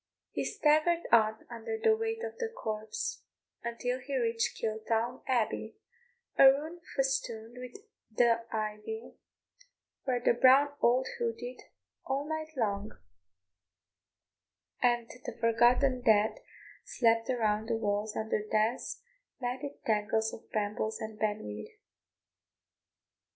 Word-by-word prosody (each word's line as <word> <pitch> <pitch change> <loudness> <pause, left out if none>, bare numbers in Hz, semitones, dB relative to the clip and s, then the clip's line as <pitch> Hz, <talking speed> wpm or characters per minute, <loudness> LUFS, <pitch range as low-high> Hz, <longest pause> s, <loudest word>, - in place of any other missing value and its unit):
He - - -2
staggered 310 +3 +3
on 220 -1 +4
under 235 - -5
the 445 0 +4
weight 450 +1 -3
of 460 -1 -4
the 465 -2 -1
corpse 220 - -4 0.4
until 245 +2 -2
he 270 +1 -3
reached 230 -1 0
Kiltown 225 +2 -1
Abbey, 230 -3 0 0.6
a - - +10
ruin 305 +6 +4
festooned 240 -4 -1
with 250 - -10 0.7
ivy, 215 - -4 0.9
where 255 -2 +1
the 240 - +3
brown 260 +4 +6
owl 245 +2 +4 0.2
hooted 240 +2 -3 0.4
all 275 +2 -2
night 315 0 -3
long, 205 -3 -1 1.8
and 240 -1 +2 0.2
the - - -6
forgotten 240 +3 +4
dead 220 -2 +3 0.4
slept 230 -1 +2
around 220 -3 +1
the 230 - +1
walls 210 0 -1
under 220 -1 -1
dense, 215 - -1 0.4
matted 260 +3 -5
tangles 220 +1 +1
of - - -11
brambles 215 +1 -2
and 220 0 -7
ben 210 -1 0
weed. 105 0 -8
235 Hz, 115 wpm, -31 LUFS, 220-270 Hz, 1.8 s, a